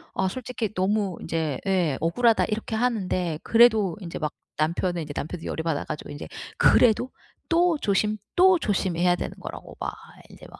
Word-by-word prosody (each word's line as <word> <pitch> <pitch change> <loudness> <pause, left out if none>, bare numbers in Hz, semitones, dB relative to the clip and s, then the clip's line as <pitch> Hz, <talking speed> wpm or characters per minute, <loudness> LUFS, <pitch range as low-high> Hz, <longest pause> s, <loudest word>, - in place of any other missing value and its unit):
아 190 - +1
솔직히 235 -1 -4
너무 195 -1 0
이제 160 -5 -2
예 175 -8 +1
'억울하다.' 225 +8 +3
이렇게 220 +1 -3
하는데 185 -9 -1
그래도 220 -5 +4
인제 170 -2 -6
막 150 -1 -2 0.2
남편은 170 +2 0
인제 145 - -7
남편도 165 +2 -5
열이 160 - -3
받아 160 -3 -1
가지고 150 - -6
인제 145 - -7 0.3
그래도 245 +2 +4 0.4
또 340 0 +3
조심 210 0 +1 0.2
또 365 -1 +6
조심해야 180 - +1
되는 - - -5
거라고 - - -9
막 - - -3 0.4
인제 - - -14
막 - - -13
190 Hz, 350 characters per minute, -25 LUFS, 165-225 Hz, 0.4 s, 또